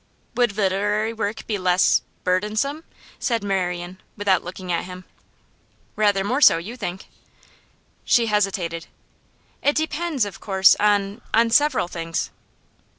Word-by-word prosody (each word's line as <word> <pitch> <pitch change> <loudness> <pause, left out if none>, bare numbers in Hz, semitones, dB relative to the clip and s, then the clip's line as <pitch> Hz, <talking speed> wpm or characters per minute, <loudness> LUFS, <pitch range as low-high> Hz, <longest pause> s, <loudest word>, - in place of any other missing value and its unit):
'Would 240 -5 +1
literary 205 +3 0
work 220 0 -4
be 210 -3 -2
less 180 0 +3 0.2
burdensome?' 215 - -1 0.4
said 230 -5 -1
Marian, 180 -2 -3 0.2
without 200 -3 +2
looking 180 +1 -7
at 170 - -1
him. 185 0 -10 0.9
'Rather 205 -2 +2
more 255 +8 -1
so, 165 - +7
you 195 +9 -7
think?' 190 -6 -6 1.0
She 235 - +3
hesitated. 190 -6 -1 0.7
'It 290 - +2
depends, 315 -4 -1
of 200 - -8
course, 190 -2 +4
on 205 +1 +1
on 230 +1 +3
several 285 -6 +3
things. 165 -1 -4
205 Hz, 125 wpm, -22 LUFS, 185-230 Hz, 1.0 s, so